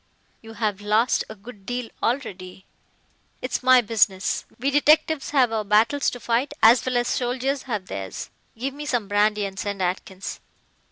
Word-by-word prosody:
"You 225 0 -11
have 210 -2 -2
lost 215 +4 +2
a 220 - -8
good 210 0 -13
deal 245 +2 -4
already." 190 -7 -3 0.7
"It's 255 - -3
my 255 -1 +6
business. 210 -4 +1
We 270 +3 0
detectives 305 +1 +3
have 260 -5 +3
our 220 -1 -1
battles 220 +7 +3
to 245 - -8
fight 240 +4 -1
as 230 +3 +7
well 255 -1 0
as 240 0 +1
soldiers 260 +2 -1
have 210 -5 -2
theirs. 95 - -6 0.3
Give 265 +4 -3
me 295 +1 -7
some 240 -7 -1
brandy 210 0 +2
and 195 0 -6
send 200 -1 -3
Atkins." 185 +1 -4
225 Hz, 165 wpm, -24 LUFS, 205-255 Hz, 0.7 s, as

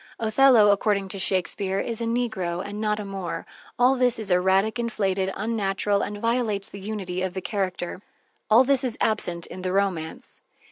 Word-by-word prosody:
Othello, 225 -1 +5
according 200 -1 +1
to 195 - -6
Shakespeare, 190 +1 0
is 230 +2 -3
a - - -1
negro 220 -7 -2
and 205 +1 -6
not 210 -1 0
a 210 - -5
Moor. 195 -3 -5 0.3
All 250 +2 +5
this 250 -2 +3
is 215 -4 -2
erratic, 190 +5 +2
inflated, 195 -5 -1
unnatural, 205 -2 0
and 205 - -4
violates 230 -3 0
the 200 - -10
unity 190 -3 -4
of 185 -1 -3
the - - -1
character. 185 -3 -3 0.5
All 225 +4 +7
this 270 0 +2
is 245 -3 0
absent 175 -6 0
in 185 - -9
the 185 0 -2
romance. 185 -5 -2
200 Hz, 175 wpm, -25 LUFS, 190-225 Hz, 0.5 s, All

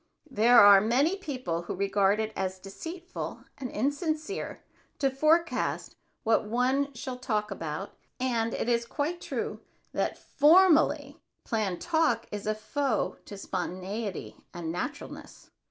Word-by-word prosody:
There 235 +2 +6
are 200 -1 +9
many 265 - +2
people 255 - -3
who 175 - -5
regard 200 +1 +2
it 220 0 -2
as 190 0 -2
deceitful 330 - -7 0.2
and 260 -2 -4
insincere 310 - -2 0.3
to 275 -1 +1
forecast 315 +5 +1 0.3
what 225 -1 +3
one 260 +4 +1
shall 250 +1 -6
talk 215 -4 -1
about 165 +1 -4 0.3
and 235 -3 0
it - - -2
is 235 -1 +2
quite 320 +7 -2
true - - -4 0.3
that - - -1
formally 320 +2 +4 0.2
planned 210 -6 -1
talk 320 -9 +1
is 210 0 -5
a 215 - +1
foe 260 +1 -1
to 205 - -9
spontaneity 190 +2 -4 0.2
and 165 -2 -4
naturalness. 235 - -7
235 Hz, 130 wpm, -28 LUFS, 200-290 Hz, 0.3 s, are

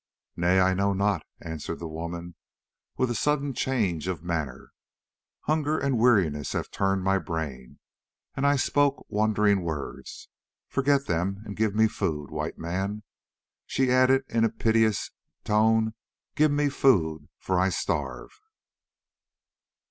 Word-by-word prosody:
"Nay, 90 +2 +3
I 95 0 +4
know 100 +1 +1
not," 100 -3 +1 0.2
answered 80 -2 -5
the 85 - -6
woman, 85 +2 -6 0.6
with 130 -1 +1
a - - 0
sudden 145 +2 0
change 100 -12 -1
of 90 -4 -3
manner. 75 -7 -4 0.7
"Hunger 155 0 0
and 135 -5 0
weariness 90 - +2
have - - -3
turned 95 -1 0
my 95 +1 +2
brain, 75 -9 -5 0.6
and 140 +1 0
I 145 - +4
spoke 145 +1 +1
wandering 105 -2 +2
words. 80 -5 -6 0.4
Forget 140 0 +1
them 95 +4 -1
and 100 - -7
give 110 -1 0
me 110 +1 +5
food, 75 -8 -3
White - - -4
Man," 95 +5 -3 0.6
she 130 -1 +1
added 130 +1 +4
in 115 -1 +1
a 115 - +4
piteous 110 -2 +1 0.3
tone, 110 +1 +3 0.4
"give 155 +1 +3
me 145 0 +1
food, 80 - +2
for 95 -1 -1
I 95 +1 +3
starve." - - -3
100 Hz, 135 wpm, -27 LUFS, 85-125 Hz, 0.7 s, me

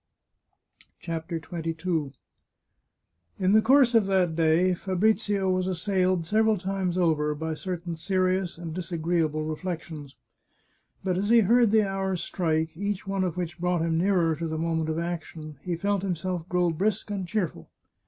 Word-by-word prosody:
CHAPTER 165 0 -4
XXII 165 -2 -3 1.2
In 185 0 +2
the 220 - +6
course 260 +1 +5
of 225 -4 +4
that 185 -4 +2
day 165 +3 +3
Fabrizio 200 +2 +1
was 185 0 0
assailed, 185 -1 0
several 220 +4 +3
times 190 -1 -2
over, 150 -4 +1
by 160 +2 -3
certain 175 +1 -4
serious 185 +1 0
and 165 -2 -6
disagreeable 165 -3 -1
reflections. 155 -3 -5 0.9
But 185 -1 0
as 205 +2 -1
he 235 0 +7
heard 235 +3 +4
the 215 -1 +3
hours 195 -2 -2
strike, 160 -2 -1
each 200 +1 -3
one 195 -1 -1
of 180 -2 -2
which 175 -2 -4
brought 180 -1 0
him 165 0 +1
nearer 175 -3 +2
to 165 +1 -3
the 160 0 -3
moment 160 -1 -1
of 160 - -1
action, 165 -3 -5
he 175 -2 -2
felt 200 +2 0
himself 180 -2 -3
grow 180 -1 +2
brisk 205 +5 -1
and 195 -3 -3
cheerful. 175 - -3
180 Hz, 155 wpm, -27 LUFS, 165-195 Hz, 1.2 s, he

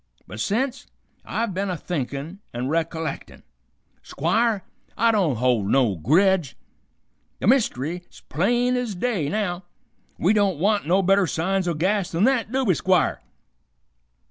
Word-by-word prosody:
But 110 - -9
sence, 250 - -1 0.4
I've 230 -3 -2
been 195 +2 -2
a 180 - -2
thinkin' 150 +2 -4 0.2
an' 125 +2 -2
recollectin'. 160 0 -3 0.6
Squire, 225 -4 0 0.3
I 230 +1 +4
don't 185 - +1
hold 120 -3 +1
no 120 -3 +2
gredge. 165 - +2 0.8
The - - -3
myst'ry's 175 - 0
plain 240 +8 +1
ez 245 -5 -2
day, 190 -7 -1
now. 185 -2 -2 0.5
We 190 +5 +3
don't 200 -5 +2
want 200 +2 +1
no 190 +3 +3
better 195 0 +3
signs 185 +4 -1
o' 170 - 0
gas 190 +4 0
th'n 175 +4 +1
th't, 250 -5 +1
do 265 0 0
we, 190 - +4
Squire?" 185 +3 +1
185 Hz, 140 wpm, -23 LUFS, 160-215 Hz, 0.8 s, I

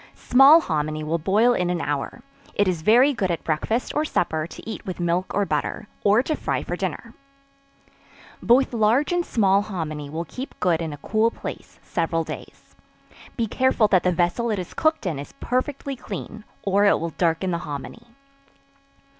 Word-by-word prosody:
Small 275 +6 +6
hominy 155 - -2
will 160 +2 -1
boil 210 +9 +3
in 180 -6 0
an 180 -1 -1
hour; 145 -3 -3 0.3
it 205 - +2
is 175 -3 -1
very 245 - +5
good 195 -7 -1
at 170 - -2
breakfast 195 +10 -1
or 300 - +1
supper 160 - -1
to - - -12
eat 220 - -6
with 185 -2 -6
milk 175 +2 0
or 205 - +2
butter, 155 +6 -2 0.2
or 210 +4 +4
to 310 - -1
fry - - -2
for - - -3
dinner. - - -5 1.3
Both 255 +2 +3
large 230 +7 +2
and 350 0 +1
small 200 - +2
hominy 155 -8 -5
will 165 +3 -4
keep 260 +8 -8
good 170 -2 +1
in 160 -2 -3
a 145 - -7
cool 220 +9 +1
place - - -9
several 165 -1 -1
days. - - -10 0.6
Be 230 - +1
careful 255 0 +2
that 185 -3 +4
the 180 - +1
vessel 175 +7 0
it 215 - 0
is 180 -2 -6
cooked 315 -6 +1
in, 160 -7 -2
is 145 - -9
perfectly 270 +2 -2
clean, 215 -1 -8 0.2
or 200 +1 +2
it 205 - +4
will 165 0 -3
darken 170 +3 0
the 170 - -1
hominy. 160 - -7
190 Hz, 180 wpm, -23 LUFS, 165-235 Hz, 1.3 s, Small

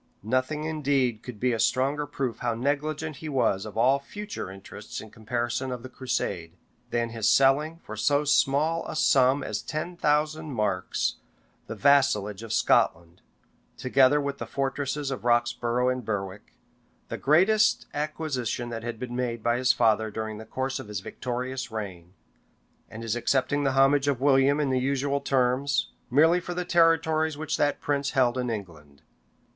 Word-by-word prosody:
[] - - -40
Nothing 130 +7 -1
indeed 140 -7 0
could 120 -4 -9
be 125 +1 +1
a 115 - -2
stronger 140 +5 +1
proof 135 -4 -3
how 120 -2 -1
negligent 150 +4 -2
he 155 - -7
was 115 -7 0
of 105 - -9
all 130 +4 +4
future 205 - -7
interests 100 +2 -9
in 110 - -11
comparison 120 +3 -3
of 125 -1 -5
the 130 - -8
crusade, 120 -10 -3 0.4
than 115 -1 -1
his 115 -2 +1
selling, 145 +4 +3
for - - -7
so 145 0 +2
small 150 +4 +2
a - - -5
sum 135 -2 +3
as - - -3
ten 165 +4 -4
thousand 155 -1 0
marks, 100 -5 -1 0.5
the - - -5
vassalage 120 -8 +3
of 115 -2 -8
Scotland, 85 -5 +1 0.6
together 135 +2 +4
with 140 -1 -3
the - - -5
fortresses 140 +1 -2
of 130 - -5
Roxborough 120 +1 +1
and 130 0 -2
Berwick, 100 -2 -5 0.5
the - - -4
greatest 200 +9 +3
acquisition 145 -6 -3
that 115 -1 -5
had 115 0 -5
been 120 +1 -6
made 120 -3 -2
by 120 0 +2
his 125 -1 +4
father 110 -2 +2
during 110 0 -5
the 110 - -9
course 135 +2 -3
of 130 - -8
his 105 -2 -5
victorious 125 +3 -4
reign; 95 -6 -7 0.8
and 115 +1 -8
his 115 -1 -1
accepting 140 +3 0
the 135 - +2
homage 135 +1 +4
of 140 -4 +1
William 140 +1 +4
in 145 -3 0
the 130 - +2
usual 140 +2 0
terms, 135 0 +1 0.2
merely 160 +7 +4
for 175 0 -6
the 180 0 -2
territories 160 -2 +2
which 155 0 -2
that 145 0 +1
prince 140 -1 -1
held 125 -2 +3
in 125 -1 -2
England. 80 -10 -8
130 Hz, 170 wpm, -26 LUFS, 115-145 Hz, 0.8 s, all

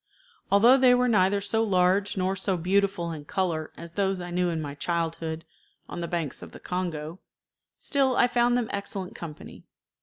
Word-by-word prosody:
Although 230 +6 +7
they 255 -2 +6
were 250 0 +2
neither 200 -3 +3
so 225 +2 0
large 190 0 +2
nor 190 +1 0
so 190 -1 -1
beautiful 185 0 0
in 155 -2 -7
color 160 -1 -2
as 170 0 -9
those 195 0 0
I 175 0 -6
knew 180 0 +1
in 165 -1 -2
my 145 -2 -5
childhood 165 +1 -3 0.4
on 175 - -6
the 170 - -3
banks 165 -5 -3
of - - -11
the - - -10
Congo, 175 -2 -4 0.6
still 270 -3 +1
I - - +6
found 240 0 +2
them 240 -2 -2
excellent 200 -2 -4
company. 155 -3 -9
185 Hz, 180 wpm, -26 LUFS, 170-205 Hz, 0.6 s, Although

